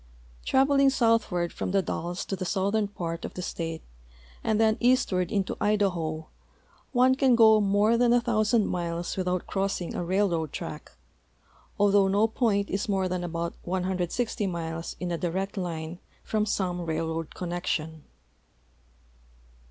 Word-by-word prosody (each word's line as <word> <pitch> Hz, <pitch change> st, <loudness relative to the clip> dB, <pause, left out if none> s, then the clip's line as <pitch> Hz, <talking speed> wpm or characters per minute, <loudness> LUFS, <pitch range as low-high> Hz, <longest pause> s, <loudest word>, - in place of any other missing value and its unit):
Traveling 275 Hz, +1 st, +4 dB
southward 225 Hz, -9 st, +1 dB
from -, -, -3 dB
the 195 Hz, 0 st, +2 dB
Dalles 175 Hz, +2 st, -3 dB
to 195 Hz, -, -3 dB
the 185 Hz, -, -5 dB
southern 200 Hz, +3 st, 0 dB
part 170 Hz, -4 st, -5 dB
of -, -, -6 dB
the 180 Hz, -, -4 dB
state 165 Hz, -2 st, -4 dB, 0.6 s
and 220 Hz, -1 st, +1 dB
then 220 Hz, -1 st, +3 dB
eastward 220 Hz, -8 st, +2 dB
into 200 Hz, -3 st, -1 dB
Idaho 175 Hz, -7 st, 0 dB, 0.7 s
one 255 Hz, 0 st, +4 dB
can 260 Hz, -2 st, +4 dB
go 220 Hz, -2 st, +6 dB
more 205 Hz, +3 st, +3 dB
than 240 Hz, 0 st, +3 dB
a 245 Hz, -, +5 dB
thousand 215 Hz, -1 st, +2 dB
miles 170 Hz, -1 st, -3 dB
without 180 Hz, -1 st, -1 dB
cro.ssing 195 Hz, -3 st, -2 dB
a -, -, -2 dB
railroad 175 Hz, -4 st, 0 dB
track, -, -, -7 dB, 0.9 s
although 200 Hz, -1 st, +4 dB
no 200 Hz, +3 st, +3 dB
point 215 Hz, -3 st, 0 dB
is 200 Hz, +2 st, -2 dB
more 190 Hz, -2 st, +1 dB
tlian 180 Hz, -1 st, -2 dB
about 170 Hz, 0 st, -3 dB
160 190 Hz, +4 st, -1 dB
miles 165 Hz, -2 st, -4 dB
in 180 Hz, 0 st, -3 dB
a 170 Hz, -, -2 dB
direct 190 Hz, +3 st, -2 dB
line 170 Hz, -2 st, -4 dB, 0.2 s
from 215 Hz, -1 st, 0 dB
some 180 Hz, -3 st, -1 dB
railroad 160 Hz, -1 st, -3 dB
connection. 170 Hz, -3 st, -3 dB
190 Hz, 145 wpm, -27 LUFS, 170-215 Hz, 0.9 s, go